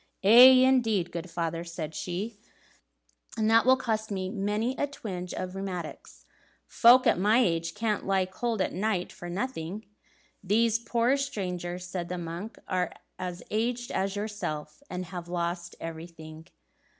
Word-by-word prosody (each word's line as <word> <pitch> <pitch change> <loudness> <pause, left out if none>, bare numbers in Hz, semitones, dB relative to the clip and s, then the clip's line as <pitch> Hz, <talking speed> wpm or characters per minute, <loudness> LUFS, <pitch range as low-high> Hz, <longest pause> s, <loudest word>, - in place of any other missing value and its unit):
"Aye, 255 +5 +9
indeed, 225 -9 +2
good 170 +1 -5
father," 165 0 -2
said 165 -2 -6
she, 200 +7 -4 1.0
"and 215 -1 +1
that 230 +2 +5
will 260 0 +7
cost 220 -3 -2
me 190 -2 -3
many 215 +4 -1
a 290 - +1
twinge 185 -10 -6
of 185 0 -5
rheumatics. 175 - -6 0.4
Folk 245 +2 +6
at - - +3
my 210 +4 +4
age 165 -8 +1
can't 215 -1 -1
lie 190 -1 +1
cold 220 +3 -2
at - - -3
night 190 -1 -1
for 175 - -9
nothing." 200 -1 -4 0.6
"These 225 +3 +2
poor 235 +3 +1
strangers," 180 -9 -4
said 180 -1 -5
the 180 - -3
monk, 175 +6 -6
"are 180 -2 -1 0.3
as 180 -1 -5
aged 240 +3 -1
as 195 +1 -1
yourself, 205 - -4
and 180 0 -4
have 175 0 -7
lost 175 0 -3
everything." 160 -1 -9
190 Hz, 150 wpm, -28 LUFS, 175-225 Hz, 1.0 s, Aye